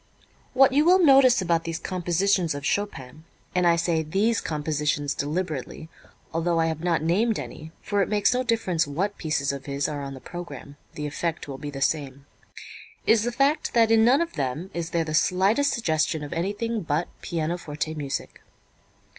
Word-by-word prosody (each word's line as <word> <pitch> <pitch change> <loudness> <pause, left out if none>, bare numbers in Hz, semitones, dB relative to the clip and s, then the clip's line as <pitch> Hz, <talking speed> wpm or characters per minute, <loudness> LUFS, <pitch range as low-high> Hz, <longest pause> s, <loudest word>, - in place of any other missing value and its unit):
What 265 0 +6
you 290 +2 +4
will 360 +3 +6
notice 270 - +6
about 170 -2 +1
these 165 -1 -3
compositions 180 -1 0
of 145 -1 -6
Chopin 155 -8 -3 0.3
and 180 -1 +2
I 170 - +5
say 165 -1 +1
"these 200 +8 +1
compositions" 150 -2 -1
deliberately, 155 0 -4 0.4
although 165 +1 +1
I 165 - +3
have 160 -1 -2
not 170 -3 +1
named 210 +7 +2
any 155 +1 -8
(for 205 -1 0
it - - 0
makes 210 +3 +2
no 250 - +1
difference 220 - 0
what 190 +8 -2
pieces 150 -4 0
of 140 0 -7
his 140 0 -1
are 145 -1 -4
on 135 -1 -6
the - - -10
program, 145 -4 -9 0.2
the 150 - -4
effect 165 +3 -3
will 135 -1 -7
be 145 - -5
the 135 -1 -3
same) 140 -3 -2 0.8
is 225 -1 +4
the 240 +2 -1
fact 280 +4 +1
that 225 -1 +4
in 225 -1 +5
none 255 +7 +5
of 335 - -2
them 150 +7 -3
is 170 -1 -3
there 170 -2 0
the 155 - -4
slightest 195 - +2
suggestion 160 -7 0
of 145 - -6
anything 205 +6 -2
but 160 0 -1
pianoforte 160 -2 -3
music. 145 -3 -5
170 Hz, 180 wpm, -25 LUFS, 150-205 Hz, 0.8 s, What